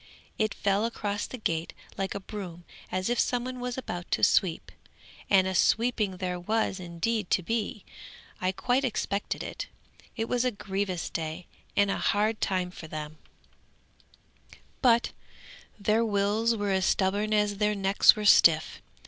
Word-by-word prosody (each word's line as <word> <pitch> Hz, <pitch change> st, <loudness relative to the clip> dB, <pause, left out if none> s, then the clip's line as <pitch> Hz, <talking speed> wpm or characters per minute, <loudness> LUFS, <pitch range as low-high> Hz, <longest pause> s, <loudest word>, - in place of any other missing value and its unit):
It 215 Hz, -1 st, 0 dB
fell 200 Hz, +1 st, +1 dB
across 205 Hz, -3 st, -3 dB
the 255 Hz, -, -7 dB
gate 165 Hz, -7 st, -2 dB, 0.2 s
like 195 Hz, 0 st, -3 dB
a -, -, -2 dB
broom, 190 Hz, -4 st, -8 dB, 0.3 s
as 185 Hz, 0 st, -1 dB
if 240 Hz, 0 st, 0 dB
some 245 Hz, -1 st, +1 dB
one 255 Hz, 0 st, -5 dB
was 245 Hz, 0 st, -4 dB
about 175 Hz, -9 st, -5 dB
to -, -, -1 dB
sweep; 175 Hz, -4 st, +2 dB, 0.6 s
and 190 Hz, -2 st, +5 dB
a 190 Hz, -, -1 dB
sweeping 215 Hz, -1 st, +2 dB
there 180 Hz, -1 st, -3 dB
was 215 Hz, +1 st, -1 dB
indeed 180 Hz, +4 st, -2 dB
to 185 Hz, -, +2 dB
be. 220 Hz, 0 st, -3 dB, 0.6 s
I 185 Hz, 0 st, +1 dB
quite 245 Hz, +7 st, 0 dB
expected 210 Hz, -5 st, -2 dB
it. -, -, -6 dB, 0.5 s
It 225 Hz, 0 st, -1 dB
was 245 Hz, 0 st, +1 dB
a 255 Hz, -, +2 dB
grievous 195 Hz, -4 st, -3 dB
day 160 Hz, +2 st, -4 dB, 0.3 s
and 200 Hz, 0 st, +4 dB
a -, -, -1 dB
hard 215 Hz, +2 st, +1 dB
time 185 Hz, -2 st, 0 dB
for 165 Hz, -, -10 dB
them, 155 Hz, 0 st, -7 dB, 1.6 s
but 235 Hz, -2 st, +4 dB, 0.7 s
their 215 Hz, +3 st, +2 dB
wills 215 Hz, +2 st, +1 dB
were 205 Hz, -2 st, -1 dB
as 190 Hz, -1 st, +2 dB
stubborn 200 Hz, +2 st, +1 dB
as 210 Hz, -1 st, +2 dB
their 210 Hz, 0 st, +1 dB
necks 195 Hz, 0 st, +5 dB
were 215 Hz, -1 st, -4 dB
stiff. -, -, +5 dB
200 Hz, 155 wpm, -28 LUFS, 185-225 Hz, 1.6 s, and